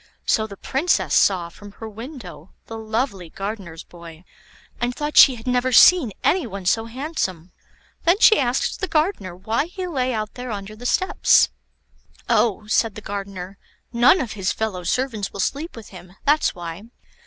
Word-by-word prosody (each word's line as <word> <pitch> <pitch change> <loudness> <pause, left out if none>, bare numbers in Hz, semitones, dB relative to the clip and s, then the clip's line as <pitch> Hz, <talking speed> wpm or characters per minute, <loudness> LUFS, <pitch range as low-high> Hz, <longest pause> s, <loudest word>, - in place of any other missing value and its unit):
So 220 -1 +1
the 200 -2 -11
Princess 290 +7 0
saw 180 -4 +3
from 205 +3 -14
her 225 - -9
window 220 - -10
the 225 - -8
lovely 220 -5 -3
gardener's 195 -4 -6
boy, 170 -1 -13 0.6
and 245 +1 -2
thought 300 0 -4
she 265 - +8
had 225 - -12
never 250 0 +1
seen 285 -1 +6
any 360 -8 +2
one 195 -3 -8
so 225 +5 +1
handsome. 230 - -4 0.5
Then 345 +3 +4
she 435 0 +6
asked 250 -1 0
the 375 - -1
gardener 305 - -1
why 220 - -1
he 370 +1 -6
lay 260 -7 -1
out 215 -2 -3
there 250 0 -7
under 205 -1 -6
the 245 +3 -5
steps. 375 +9 +3 0.8
"Oh," 215 -2 +1
said 215 0 +1
the 215 - -8
gardener, 195 -2 -7 0.3
"none 240 +10 +5
of 240 -5 -4
his 195 -3 -2
fellow 210 -5 -3
servants 225 +1 -2
will 200 - -9
sleep 290 - -2
with 225 -3 -11
him; 180 -1 -13
that's 295 +2 +2
why." 175 +3 -7
220 Hz, 170 wpm, -22 LUFS, 195-260 Hz, 0.8 s, she